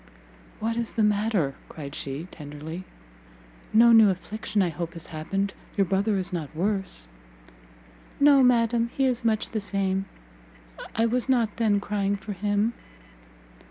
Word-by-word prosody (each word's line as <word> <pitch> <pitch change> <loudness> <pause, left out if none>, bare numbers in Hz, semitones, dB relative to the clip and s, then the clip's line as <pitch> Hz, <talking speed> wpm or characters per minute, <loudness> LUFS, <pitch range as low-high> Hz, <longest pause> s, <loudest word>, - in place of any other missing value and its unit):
"What 230 +1 -1
is 235 -1 -2
the 220 - +1
matter?" 205 -8 +1 0.2
cried 140 -3 -8
she, 145 +4 -5
tenderly; 155 +3 -8 0.9
"no 235 +2 +7
new 220 -2 +8
affliction 205 +2 -1
I 180 - +1
hope 170 +1 -5
has 165 -2 -8
happened? 195 +5 -2 0.2
Your 200 - +4
brother 195 +3 +1
is 185 0 -3
not 160 -3 -4
worse?" 190 - 0 1.1
"No, 285 -1 +7
madam, 235 -2 +3
he 270 - +3
is 250 -2 0
much 220 -2 +1
the 220 - -2
same; 195 -1 -1 0.9
I 225 - +3
was 245 +3 0
not 235 -5 +2
then 215 -3 +3
crying 200 -1 -1
for 200 +1 -6
him." 205 +4 0
205 Hz, 145 wpm, -26 LUFS, 180-225 Hz, 1.1 s, new